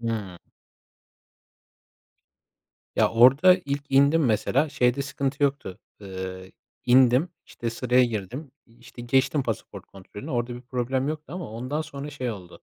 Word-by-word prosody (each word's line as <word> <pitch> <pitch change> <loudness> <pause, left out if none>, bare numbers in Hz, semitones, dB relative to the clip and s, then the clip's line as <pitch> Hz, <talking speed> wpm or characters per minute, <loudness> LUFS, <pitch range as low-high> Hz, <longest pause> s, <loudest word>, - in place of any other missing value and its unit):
Hıı. 110 -6 -4 2.6
Ya, - - +3
orada 135 +10 +6
ilk 140 0 -2
indim 140 +4 +4
mesela, 120 +6 +1
şeyde 140 -1 +1
sıkıntı 140 +1 -3
yoktu. 140 -10 -1 0.2
Eee, 95 -1 -7 0.3
indim. 130 +5 +5 0.2
İşte, 115 - -5
sıraya 125 +2 +2
girdim. 120 - -5 0.2
İşte, 120 +1 -13
geçtim 135 +4 +1
pasaport 115 -5 -6
kontrolünü, 100 +2 -11
orada 120 -1 -2
bir 120 - -8
problem 130 +2 -2
yoktu 155 -1 -6
ama 180 -10 -6
ondan 130 +7 -4
sonra 145 -1 -8
şey 130 -4 -4
oldu. 90 -5 -11
125 Hz, 130 wpm, -25 LUFS, 115-140 Hz, 2.6 s, orada